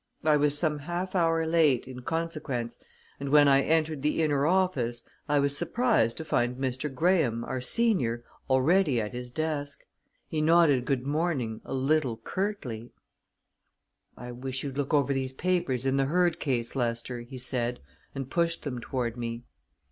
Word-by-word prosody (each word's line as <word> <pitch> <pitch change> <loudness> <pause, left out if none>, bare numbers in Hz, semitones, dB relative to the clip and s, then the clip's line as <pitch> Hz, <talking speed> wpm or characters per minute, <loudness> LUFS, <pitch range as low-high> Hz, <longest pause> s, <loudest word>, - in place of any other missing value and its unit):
I 155 -1 +4
was 145 0 +2
some 150 -2 +1
half 175 +5 -4
hour 165 -3 +2
late, 155 -7 +3
in 130 -1 -8
consequence, 140 -5 -3 0.4
and 140 0 -4
when 145 0 +6
I 135 0 +5
entered 155 -1 +1
the 150 +2 +1
inner 145 -1 +2
office, 145 -11 +1 0.3
I 145 - +3
was 140 0 +2
surprised 225 - +1
to 160 - -6
find 125 -4 0
Mr. 130 +2 -2
Graham, 135 -6 +1
our 130 +1 -4
senior, 130 - +1 0.3
already 140 +1 +3
at 105 0 -3
his 125 0 -6
desk. 145 +1 -3 0.4
He 155 - -2
nodded 155 -5 +4
good 130 -2 -1
morning 140 -7 -1
a - - -5
little 135 -3 +1
curtly. 125 - -4 1.3
"I 125 +1 -7
wish 130 +2 -4
you'd 140 -2 -5
look 140 +1 -2
over 140 -2 +3
these 130 -1 -2
papers 160 -5 0
in 135 0 +2
the 135 - +2
Hurd 175 +3 +1
case, 120 -4 -1
Lester," 120 -1 -2
he 120 +2 -9
said, 125 -1 -1 0.4
and 135 -2 -4
pushed 165 +3 0
them 125 -5 -4
toward 120 -1 -3
me. 115 0 -4
140 Hz, 165 wpm, -28 LUFS, 125-160 Hz, 1.3 s, when